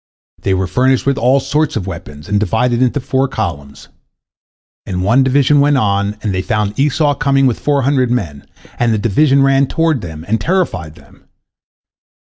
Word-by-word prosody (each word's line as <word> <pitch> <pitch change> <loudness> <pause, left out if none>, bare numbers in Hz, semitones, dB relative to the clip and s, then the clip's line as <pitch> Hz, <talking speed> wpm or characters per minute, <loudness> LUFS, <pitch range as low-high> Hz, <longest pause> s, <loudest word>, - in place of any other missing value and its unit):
They 95 - 0
were 95 +1 -1
furnished 130 +7 +1
with 140 0 0
all 130 +3 +3
sorts 150 +3 -1
of 105 -5 -3
weapons, 75 -5 -9
and 105 0 0
divided 120 +4 0
into 130 +3 +1
four 135 +1 -1
columns. 80 - -6 1.0
And 90 -1 -4
one 115 +7 +3
division 140 +2 +3
went 145 0 +3
on, 100 -2 0
and 105 -3 -1
they 95 - -1
found 105 0 -2
Esau 145 +1 +2
coming 140 -2 +1
with 125 -3 0
four 145 -2 0
hundred 130 -2 +1
men, 85 - -3 0.3
and 120 -1 +2
the 110 - +1
division 135 +7 +2
ran 135 0 +3
toward 160 -5 0
them, 80 -2 -8
and 110 +1 -1
terrified 160 - -2
them. 75 -4 -21
125 Hz, 175 wpm, -15 LUFS, 100-140 Hz, 1.0 s, all